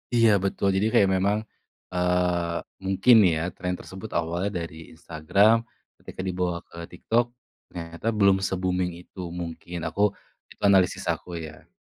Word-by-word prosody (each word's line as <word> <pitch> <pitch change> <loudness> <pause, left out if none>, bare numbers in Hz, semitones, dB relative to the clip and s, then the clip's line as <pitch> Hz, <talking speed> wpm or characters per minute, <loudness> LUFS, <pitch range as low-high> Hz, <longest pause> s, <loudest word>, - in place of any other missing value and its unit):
Iya 115 -1 +6
betul 100 0 0
jadi 100 +3 +2
kayak 100 -5 +5
memang, 100 +2 +2 0.6
eee, 90 -1 +1 0.3
mungkin 95 +6 +5 0.2
ya 80 - -1 0.2
tren 90 0 -2
tersebut 95 +4 -9
awalnya 85 +4 -1
dari 80 -1 -8 0.2
Instagram, 90 +7 +3 0.4
ketika - - -8
dibawa 90 -1 -1
ke - - -14
TikTok, 115 +7 +1 0.4
ternyata 85 +3 -7
belum 100 -1 +5
se-booming 90 -1 -1
itu 95 - -16 0.2
mungkin 85 +1 -6
aku, 100 - -3 0.5
itu - - -17
analisis 95 -2 +3
aku - - -6
ya. 80 - -11
90 Hz, 135 wpm, -25 LUFS, 85-100 Hz, 0.6 s, Iya